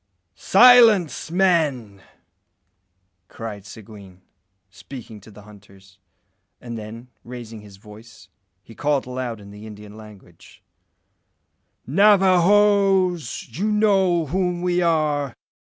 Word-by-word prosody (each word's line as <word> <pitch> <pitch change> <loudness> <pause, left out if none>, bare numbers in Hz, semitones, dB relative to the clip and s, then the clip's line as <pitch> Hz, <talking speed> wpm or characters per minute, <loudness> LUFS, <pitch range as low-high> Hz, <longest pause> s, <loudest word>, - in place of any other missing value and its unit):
"Silence, 220 - +4
men!" 155 - -1 1.3
cried 105 -2 -9
Seguin, 100 -4 -14 0.5
speaking 110 +1 -12
to 105 - -17
the 105 0 -16
hunters; 95 -2 -19 0.6
and 120 -1 -9
then, 115 +3 -10
raising 115 -3 -10
his 100 -2 -16
voice, 105 +3 -16 0.4
he 115 - -16
called 145 +3 -2
aloud 125 -3 -6
in 100 -1 -14
the 105 +2 -12
Indian 105 -1 -13
language 105 -6 -17 1.2
"Navajoes! 195 - +2
you 200 - -3
know 195 -5 +1
whom 180 +2 -3
we 180 0 0
are. 150 -5 -1
125 Hz, 100 wpm, -21 LUFS, -, 1.3 s, Silence